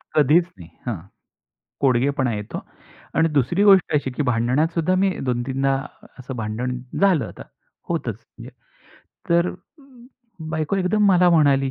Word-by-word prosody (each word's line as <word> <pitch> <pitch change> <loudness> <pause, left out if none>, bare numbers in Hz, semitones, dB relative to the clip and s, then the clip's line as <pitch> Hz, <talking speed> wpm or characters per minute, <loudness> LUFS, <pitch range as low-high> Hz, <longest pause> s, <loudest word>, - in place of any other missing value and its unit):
कधीच 155 +4 +5
नाही 85 -1 -12 0.2
हां. 120 - -1 0.9
कोडगेपणा 130 0 +2
येतो 105 0 -5 0.6
आणि 165 - +3
दुसरी 150 +6 +1
गोष्ट 195 -6 +5
अशी, 135 -3 -1
की 135 - -3
भांडणात 125 +5 +1
सुद्धा 175 +2 +1
मी 195 +1 +2 0.2
2-3दा 135 +3 0 0.4
असं 130 0 -7
भांडण 115 +3 -3 0.2
झालं, 180 - +3
आता - - -10 0.5
होतच. - - -2 1.1
तर 170 +1 +3 1.0
बायको 155 +3 -1
एकदम 195 +3 +1
मला 180 -1 +5
म्हणाली, 140 -4 +3
140 Hz, 125 wpm, -22 LUFS, 125-170 Hz, 1.1 s, कधीच